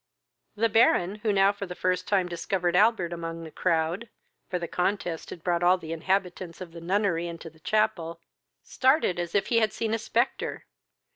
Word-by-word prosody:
The 225 Hz, +2 st, +2 dB
Baron, 210 Hz, -3 st, +3 dB
who 215 Hz, 0 st, 0 dB
now 195 Hz, 0 st, +4 dB
for 200 Hz, -1 st, -6 dB
the 180 Hz, -, -7 dB
first 185 Hz, 0 st, -1 dB
time 190 Hz, -3 st, +2 dB
discovered 175 Hz, 0 st, -1 dB
Albert 195 Hz, -4 st, +3 dB
among 165 Hz, 0 st, -5 dB
the 160 Hz, -, -9 dB
crowd, 170 Hz, +7 st, 0 dB, 0.4 s
(for 180 Hz, -, -1 dB
the 170 Hz, -1 st, -4 dB
contest 180 Hz, -2 st, -2 dB
had 165 Hz, -, -9 dB
brought 175 Hz, -1 st, +1 dB
all 180 Hz, +1 st, +5 dB
the 160 Hz, -3 st, -8 dB
inhabitants 180 Hz, 0 st, -2 dB
of 180 Hz, -3 st, -8 dB
the 170 Hz, 0 st, -10 dB
nunnery 180 Hz, -1 st, 0 dB
into 165 Hz, -1 st, -8 dB
the 160 Hz, -, -22 dB
chapel,) 175 Hz, -4 st, 0 dB, 0.4 s
started 260 Hz, -, +2 dB
as 175 Hz, +1 st, -4 dB
if 200 Hz, -, +3 dB
he 230 Hz, -, +4 dB
had 220 Hz, -2 st, +1 dB
seen 225 Hz, -1 st, -2 dB
a 225 Hz, -, 0 dB
spectre. -, -, -1 dB
180 Hz, 190 wpm, -27 LUFS, 170-205 Hz, 0.4 s, all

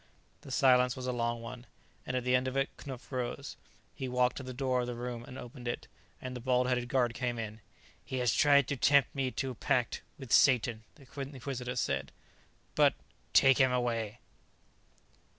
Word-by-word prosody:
The -, -, -12 dB
silence 125 Hz, -1 st, +4 dB
was 130 Hz, -, -6 dB
a 130 Hz, -, 0 dB
long 120 Hz, -1 st, -1 dB
one, 120 Hz, +1 st, -8 dB, 0.4 s
and 130 Hz, -, -1 dB
at 125 Hz, -, -2 dB
the 125 Hz, 0 st, +1 dB
end 125 Hz, +1 st, +1 dB
of 130 Hz, +1 st, -2 dB
it 135 Hz, 0 st, 0 dB
Knupf 130 Hz, -2 st, -9 dB
rose. 130 Hz, +2 st, -4 dB, 0.4 s
He 135 Hz, -3 st, -5 dB
walked 125 Hz, 0 st, +2 dB
to -, -, -4 dB
the 130 Hz, 0 st, -6 dB
door 130 Hz, -1 st, 0 dB
of 120 Hz, -, -3 dB
the 120 Hz, -, -4 dB
room 120 Hz, 0 st, -5 dB
and 130 Hz, -, -9 dB
opened 125 Hz, 0 st, -9 dB
it, 120 Hz, -, -3 dB, 0.3 s
and 130 Hz, 0 st, -6 dB
the -, -, -4 dB
bald 125 Hz, 0 st, +2 dB
headed 125 Hz, -1 st, 0 dB
guard 120 Hz, -2 st, +2 dB
came 120 Hz, 0 st, -2 dB
in. 110 Hz, -1 st, -6 dB, 0.4 s
"He 130 Hz, -, -4 dB
has 125 Hz, -2 st, +2 dB
tried 140 Hz, -2 st, +5 dB
to 145 Hz, -, 0 dB
tempt 140 Hz, +2 st, +4 dB
me 135 Hz, -2 st, 0 dB
to 130 Hz, 0 st, -3 dB
pact 120 Hz, 0 st, 0 dB, 0.2 s
with 130 Hz, -5 st, -10 dB
Satan," 115 Hz, -4 st, +4 dB
the 140 Hz, -3 st, -17 dB, 0.2 s
Inquisitor 130 Hz, -2 st, -5 dB
said. 70 Hz, -, -1 dB, 0.6 s
"But -, -, +4 dB, 0.2 s
" -, -, -37 dB
"Take 135 Hz, 0 st, +6 dB
him 130 Hz, -1 st, +5 dB
away." 120 Hz, -3 st, -1 dB
125 Hz, 195 wpm, -31 LUFS, 120-130 Hz, 0.6 s, Take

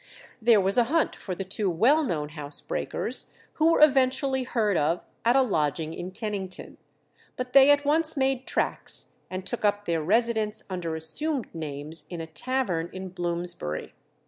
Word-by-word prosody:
There 225 Hz, -1 st, +6 dB
was 195 Hz, +4 st, +3 dB
a 240 Hz, -, +4 dB
hunt 320 Hz, +6 st, +1 dB
for 185 Hz, -, -6 dB
the 195 Hz, -, -4 dB
two 195 Hz, +1 st, -1 dB
well 245 Hz, -, +4 dB
known 155 Hz, -, -2 dB
house 150 Hz, -2 st, -4 dB
breakers, -, -, -1 dB, 0.3 s
who 325 Hz, +1 st, +6 dB
were -, -, +3 dB
eventually 265 Hz, -2 st, +4 dB
heard 215 Hz, -5 st, +1 dB
of 165 Hz, +2 st, +1 dB, 0.2 s
at 235 Hz, +3 st, +4 dB
a 270 Hz, -, +6 dB
lodging 155 Hz, -, -1 dB
in 175 Hz, +2 st, -6 dB
Kennington. 195 Hz, -2 st, -5 dB, 0.6 s
But 250 Hz, 0 st, -4 dB
they 275 Hz, 0 st, +8 dB
at 290 Hz, 0 st, +4 dB
once 310 Hz, +1 st, +1 dB
made 265 Hz, -1 st, 0 dB
tracks, -, -, -2 dB, 0.2 s
and 185 Hz, 0 st, -5 dB
took 240 Hz, +4 st, -2 dB
up 205 Hz, 0 st, +1 dB
their 165 Hz, -2 st, 0 dB
residence 220 Hz, +3 st, +1 dB
under 170 Hz, -3 st, -3 dB
assumed 250 Hz, -, -2 dB
names 155 Hz, 0 st, -4 dB
in 175 Hz, -, -6 dB
a 165 Hz, -, -4 dB
tavern 175 Hz, -1 st, -2 dB
in 185 Hz, 0 st, -6 dB
Bloomsbury. 175 Hz, -, -3 dB
200 Hz, 170 wpm, -27 LUFS, 170-260 Hz, 0.6 s, they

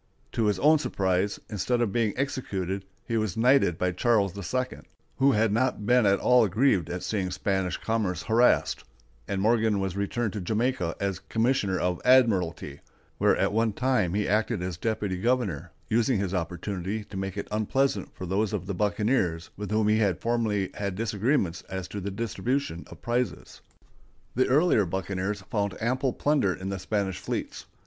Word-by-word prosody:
To 115 Hz, -, 0 dB
his 105 Hz, -2 st, +2 dB
own 155 Hz, +7 st, +5 dB
surprise, 95 Hz, -6 st, 0 dB
instead 115 Hz, +4 st, -1 dB
of 120 Hz, -4 st, +1 dB
being 115 Hz, -3 st, +1 dB
executed, 100 Hz, -8 st, -2 dB, 0.2 s
he 115 Hz, -, 0 dB
was 110 Hz, -4 st, -1 dB
knighted 120 Hz, -7 st, +4 dB
by 90 Hz, 0 st, 0 dB
Charles 100 Hz, 0 st, +1 dB
II, 125 Hz, +7 st, -3 dB, 0.4 s
who 135 Hz, 0 st, +4 dB
had 110 Hz, -1 st, +2 dB
not 115 Hz, -2 st, 0 dB
been 125 Hz, -2 st, +4 dB
at 100 Hz, 0 st, +4 dB
all 125 Hz, -3 st, +4 dB
grieved 100 Hz, -, +2 dB
at 90 Hz, 0 st, -4 dB
seeing 95 Hz, -4 st, -1 dB
Spanish 95 Hz, 0 st, -1 dB
commerce 105 Hz, -6 st, -1 dB
harassed; 120 Hz, +2 st, +3 dB, 0.4 s
and 100 Hz, -1 st, -2 dB
Morgan 110 Hz, 0 st, +2 dB
was 95 Hz, -1 st, -2 dB
returned 100 Hz, +3 st, -1 dB
to 105 Hz, -, -4 dB
Jamaica 110 Hz, -3 st, -1 dB
as 100 Hz, -2 st, -2 dB
commissioner 110 Hz, -5 st, 0 dB
of 90 Hz, -1 st, -1 dB
admiralty, 95 Hz, -, +3 dB, 0.4 s
where -, -, +4 dB
at -, -, +1 dB
one 110 Hz, 0 st, +1 dB
time 125 Hz, -8 st, +1 dB
he 105 Hz, 0 st, 0 dB
acted 105 Hz, -1 st, 0 dB
as 90 Hz, -2 st, -3 dB
deputy 100 Hz, 0 st, -2 dB
governor, 115 Hz, -, -1 dB, 0.2 s
using 120 Hz, +2 st, +2 dB
his 95 Hz, -1 st, -2 dB
opportunity 95 Hz, +4 st, -3 dB
to 105 Hz, -, -12 dB
make 95 Hz, 0 st, -4 dB
it 100 Hz, -, -4 dB
unpleasant 110 Hz, 0 st, 0 dB
for 95 Hz, -, -6 dB
those 100 Hz, +4 st, 0 dB
of 95 Hz, -4 st, -2 dB
the 100 Hz, -, -3 dB
buccaneers 105 Hz, -3 st, 0 dB
with 105 Hz, -1 st, -6 dB
whom 110 Hz, 0 st, +2 dB
he 110 Hz, +1 st, +3 dB
had 100 Hz, -5 st, +1 dB
formerly 110 Hz, -5 st, 0 dB
had 100 Hz, -2 st, -3 dB
disagreements 105 Hz, -, 0 dB
as 95 Hz, -1 st, -4 dB
to 100 Hz, -, -5 dB
the 100 Hz, -, -3 dB
distribution 115 Hz, -, -2 dB
of -, -, -13 dB
prizes. 120 Hz, +1 st, -2 dB, 0.7 s
The 130 Hz, +2 st, +2 dB
earlier 135 Hz, -, +3 dB
buccaneers 95 Hz, +2 st, -3 dB
found 100 Hz, -1 st, -2 dB
ample 130 Hz, +3 st, 0 dB
plunder 140 Hz, -12 st, +1 dB
in 95 Hz, +1 st, -6 dB
the 95 Hz, 0 st, -3 dB
Spanish 95 Hz, -2 st, -2 dB
fleets. -, -, -5 dB
105 Hz, 170 wpm, -27 LUFS, 95-115 Hz, 0.7 s, own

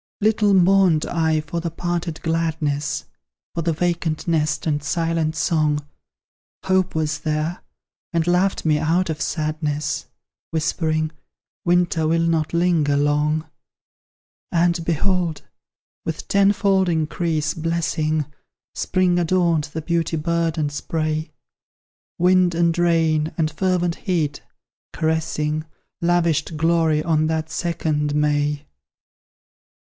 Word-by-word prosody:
Little 210 Hz, -1 st, +3 dB
mourned 185 Hz, -3 st, +4 dB
I 160 Hz, -2 st, +1 dB
for 155 Hz, +3 st, -4 dB
the 170 Hz, 0 st, -3 dB
parted 170 Hz, 0 st, -3 dB
gladness, 160 Hz, -3 st, -1 dB, 0.5 s
For 170 Hz, -, -2 dB
the 165 Hz, +1 st, 0 dB
vacant 165 Hz, -1 st, -1 dB
nest 155 Hz, -2 st, 0 dB
and 150 Hz, -2 st, 0 dB
silent 165 Hz, +1 st, -1 dB
song 155 Hz, -3 st, +1 dB, 0.8 s
Hope 190 Hz, -2 st, +1 dB
was 155 Hz, -1 st, -1 dB
there, 155 Hz, +3 st, -2 dB, 0.5 s
and 165 Hz, -1 st, +1 dB
laughed 180 Hz, +2 st, +1 dB
me 155 Hz, -1 st, +3 dB
out 170 Hz, +2 st, +1 dB
of 155 Hz, -, -5 dB
sadness; 155 Hz, -1 st, -2 dB, 0.4 s
Whispering, 155 Hz, -1 st, 0 dB, 0.5 s
"Winter 175 Hz, -2 st, +2 dB
will 165 Hz, +1 st, +2 dB
not 165 Hz, -2 st, +1 dB
linger 170 Hz, -4 st, +2 dB
long!" 150 Hz, +2 st, +1 dB, 1.1 s
And, 170 Hz, 0 st, +2 dB
behold! 170 Hz, 0 st, 0 dB, 0.6 s
with 160 Hz, -1 st, -5 dB
tenfold 195 Hz, -1 st, +3 dB
increase 160 Hz, -1 st, 0 dB
blessing, 160 Hz, -2 st, -1 dB, 0.5 s
Spring 185 Hz, -2 st, +1 dB
adorned 170 Hz, -3 st, +2 dB
the 160 Hz, 0 st, -6 dB
beauty 165 Hz, 0 st, 0 dB
burdened 165 Hz, -1 st, 0 dB
spray; 155 Hz, +1 st, -2 dB, 0.9 s
Wind 180 Hz, 0 st, +3 dB
and 170 Hz, -1 st, +2 dB
rain 165 Hz, -3 st, +2 dB
and 155 Hz, -2 st, +1 dB
fervent 175 Hz, +1 st, 0 dB
heat, 160 Hz, -7 st, -1 dB, 0.5 s
caressing, 155 Hz, -1 st, -1 dB, 0.4 s
Lavished 170 Hz, -2 st, +1 dB
glory 160 Hz, -1 st, +2 dB
on 155 Hz, -1 st, +2 dB
that 160 Hz, 0 st, -2 dB
second 155 Hz, -4 st, -1 dB
May! 150 Hz, 0 st, +1 dB
160 Hz, 110 wpm, -22 LUFS, 155-175 Hz, 1.1 s, mourned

